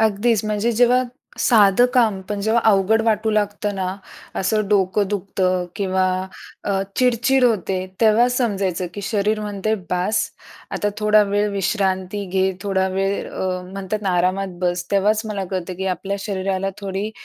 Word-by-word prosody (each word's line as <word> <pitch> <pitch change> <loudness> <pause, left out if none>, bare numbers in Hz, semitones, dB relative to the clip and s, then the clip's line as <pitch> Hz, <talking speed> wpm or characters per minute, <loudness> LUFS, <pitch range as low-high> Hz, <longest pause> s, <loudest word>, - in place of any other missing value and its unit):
अगदीच. 220 0 +2
म्हणजे 215 +2 0
जेव्हा 245 +2 +4 0.4
साधं 215 0 +5
काम 220 -6 +3
पण 205 -1 -3
जेव्हा 220 +3 +2
अवघड 205 +3 +3
वाटू 220 -1 +1
लागतं 205 -1 -1
ना, 185 -1 -2 0.4
असं 215 +2 0
डोकं 200 0 +2
दुखतं 185 -2 -1
किंवा 190 -1 +1 0.6
अ, 195 -1 0
चिडचिड 250 +1 +3
होते. 195 -5 +1 0.2
तेव्हा 225 +2 +5
समजायचं, 200 -8 -1
की 205 - -5
शरीर 210 +1 0
म्हणते 210 +1 -1 0.2
"बास, 185 +4 +1 0.5
आता 205 - -1
थोडा 210 0 +5
वेळ 205 +1 +1
विश्रांती 195 0 -1
घे 190 +1 +1
थोडा 190 -2 +1
वेळ" 195 +1 -2
अ, 185 -1 -2
म्हणतात 195 +2 -4
आरामात 185 +1 0
बस 175 -1 0
तेव्हाच 210 +2 +2
मला 200 -3 -3
कळतं, 185 -1 -3
की 190 +2 -4
आपल्या 195 +3 -4
शरीराला 195 -1 -2
थोडी 200 +1 -3
200 Hz, 145 wpm, -21 LUFS, 190-215 Hz, 0.6 s, साधं